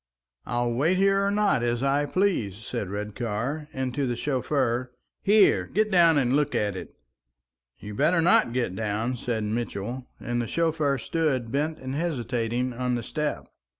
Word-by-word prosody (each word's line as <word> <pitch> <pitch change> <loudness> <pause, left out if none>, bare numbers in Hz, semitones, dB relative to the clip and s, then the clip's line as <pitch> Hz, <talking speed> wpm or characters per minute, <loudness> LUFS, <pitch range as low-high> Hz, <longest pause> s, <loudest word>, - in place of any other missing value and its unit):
"I'll 120 -1 0
wait 155 +10 +2
here 195 +1 +3
or 200 - +2
not 205 - +2
as 120 +1 0
I 140 +1 +2
please," 155 - 0
said 105 -3 -5
Redcar; 110 +8 -3
and 130 -1 -3
to 140 0 -1
the 120 - -1
chauffeur, 125 -2 -1 0.3
"Here! 205 0 +4
get 215 +1 0
down 170 -4 +5
and 130 -1 +2
look 145 0 +1
at 105 -2 0
it!" 95 - -8 0.8
"You'd 105 0 -8
better 165 +4 +3
not 165 -7 +4
get 120 -6 -1
down," 110 +4 -1
said 115 -2 -2
Mitchell; 115 +2 -3
and 120 0 -2
the 120 - -3
chauffeur 155 -3 +1
stood 130 -4 -1
bent 150 +4 -1
and 130 -2 -6
hesitating 125 -5 -1
on 125 +1 -1
the 120 - -3
step. 150 +5 -3
130 Hz, 165 wpm, -26 LUFS, 115-155 Hz, 0.8 s, down